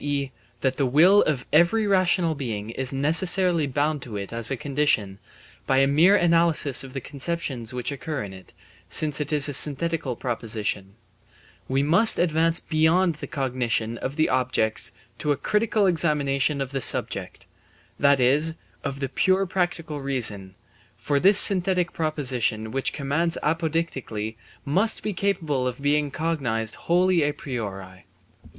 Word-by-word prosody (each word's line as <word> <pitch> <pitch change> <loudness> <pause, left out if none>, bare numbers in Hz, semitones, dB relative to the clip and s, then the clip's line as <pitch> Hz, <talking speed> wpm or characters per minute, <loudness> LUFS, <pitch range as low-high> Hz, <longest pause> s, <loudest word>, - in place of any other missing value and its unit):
e., 140 -2 -2 0.3
that 130 -1 -1
the 140 - +1
will 175 +10 +5
of 140 -5 -1
every 170 +8 +3
rational 185 -4 +2
being 115 -7 -5
is 130 +2 -1
necessarily 165 +3 +3
bound 145 +2 -1
to 115 -4 -7
it 100 +2 -7
as 115 -1 0
a 135 - -2
condition, 135 -9 -1 0.5
by 135 - +2
a 135 - +4
mere 160 +8 +4
analysis 165 -7 +3
of 130 -1 -11
the 135 - -4
conceptions 140 -4 -4
which 125 +2 -3
occur 140 -2 -5
in 100 -2 -8
it, 95 -1 -14 0.4
since 150 -1 +1
it 145 +1 -4
is 150 -1 +4
a 145 - -3
synthetical 145 -1 -1
proposition; 105 -5 -4 0.7
we 135 +1 0
must 175 +10 +4
advance 165 0 +1
beyond 165 +3 +1
the - - -5
cognition 120 -4 -2
of 135 - -5
the 155 - +2
objects 125 -4 -1 0.3
to 150 - -1
a 145 - 0
critical 210 - 0
examination 150 -5 +1
of 135 -1 -4
the 135 -1 -3
subject, - - -2 0.5
that 140 -1 +4
is, 145 +6 +2 0.3
of 140 0 -5
the 135 - -1
pure 190 +7 +1
practical 175 -5 -3
reason, 110 -8 -1 0.4
for 145 -1 -1
this 195 +5 +5
synthetic 185 -3 +4
proposition 125 -8 -1
which 135 +2 -1
commands 155 +4 -1
apodeictically 150 -9 -2 0.3
must 195 +10 +1
be 215 - -3
capable 160 -9 -1
of 125 0 -5
being 145 +1 0
cognized 135 -8 -2
wholly 180 0 +1
a 145 0 +1
priori. 95 - -7
145 Hz, 150 wpm, -24 LUFS, 125-165 Hz, 0.7 s, will